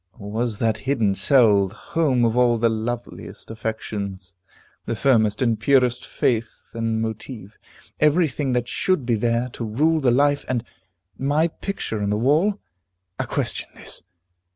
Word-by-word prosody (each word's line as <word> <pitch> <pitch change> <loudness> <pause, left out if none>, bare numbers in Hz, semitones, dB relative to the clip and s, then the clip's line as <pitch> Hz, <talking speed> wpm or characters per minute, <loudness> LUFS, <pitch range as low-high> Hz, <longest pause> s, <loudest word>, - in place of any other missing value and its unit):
Or 100 0 -8
was 115 0 -1
that 110 0 0
hidden 115 -8 +2
cell 105 -4 +4
the 100 - -13
home 130 -1 +1
of 115 0 +1
all 120 -1 +4
the 115 +1 +3
loveliest 115 +1 -5
affections, 105 -4 -5 0.5
the 115 - -1
firmest 110 -2 +2
and 115 -3 +1
purest 125 0 +2
faith 115 -2 -2
and 115 -1 -1
motive, 110 -2 -7 0.4
every 155 +3 +4
thing 135 -1 -2
that 120 -1 0
should 185 0 0
be 120 - +1
there 115 +2 0
to 120 - -7
rule 150 +9 +2
the 135 -4 +2
life 145 +3 +3
and 120 -3 -1 0.6
my 145 +5 +2
picture 155 - -4
on 100 - 0
the 105 - +1
wall? 160 - +2 0.6
A - - -1
question - - -2
this. - - -5
120 Hz, 155 wpm, -23 LUFS, 110-135 Hz, 0.6 s, cell